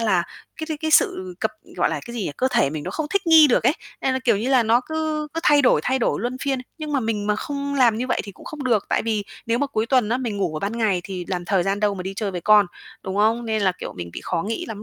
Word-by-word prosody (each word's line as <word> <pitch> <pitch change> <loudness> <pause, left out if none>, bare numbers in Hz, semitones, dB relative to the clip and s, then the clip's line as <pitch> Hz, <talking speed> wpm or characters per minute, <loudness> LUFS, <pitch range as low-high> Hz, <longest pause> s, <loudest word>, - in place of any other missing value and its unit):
là 195 -6 +2 0.4
cái 315 - -3
cái 315 - -1
sự 185 - +2
cập 220 - +1 0.3
gọi - - +2
là, - - -2
cái 235 - -8
gì 230 - -3
nhỉ, - - -2
cơ 260 - +1
thể 140 - +2
mình 155 -1 -5
nó - - -4
không 315 -2 -3
thích 400 -1 0
nghi 320 -2 +8
được 250 - +2
ấy, - - +4 0.3
nên 265 - +1
là, 260 - 0
kiểu 230 -4 +4
như 225 +6 -2
là, 260 -3 +4
nó 230 +2 +3
cứ 315 -1 -2
cứ 330 - -1
thay 295 -5 +5
đổi, 250 - +4
thay 260 +1 +1
đổi 235 - 0
luân 245 +2 -2
phiên. 275 -2 0 0.2
Nhưng 305 -1 -5
mà 275 - +2
mình 220 -3 -2
mà 210 0 +1
không 280 +3 -4
làm 240 -5 +4
như 250 - -2
vậy - - 0
thì 200 - -9
cũng - - -16
không 300 -3 -7
được, 225 -6 +2
tại - - +1
vì 215 -3 -1 0.2
nếu 230 +1 +1
mà 285 - +1
cuối 220 -4 -1
tuần 250 -4 +2
á, 235 - +1
mình 235 -5 -3
ngủ 180 -6 -1
ở - - -1
ban 215 +4 -3
ngày 205 -5 +1
thì 185 -2 -5
làm 180 -2 -2
thời 185 0 +1
gian 195 +2 -1
đâu 205 -1 +2
mà 185 - -5
đi 190 +1 -4
chơi 210 -3 -2
với 180 - -4
con, 210 +1 +5 0.4
đúng 190 0 -4
không? 225 +3 +2
Nên 220 -2 0
là, 185 - +3
kiểu, - - -6
mình 85 -1 -6
bị - - -6
khó 170 -2 -1
nghĩ 225 +2 -3
lắm 215 -2 -7
225 Hz, 310 wpm, -22 LUFS, 200-265 Hz, 0.4 s, nghi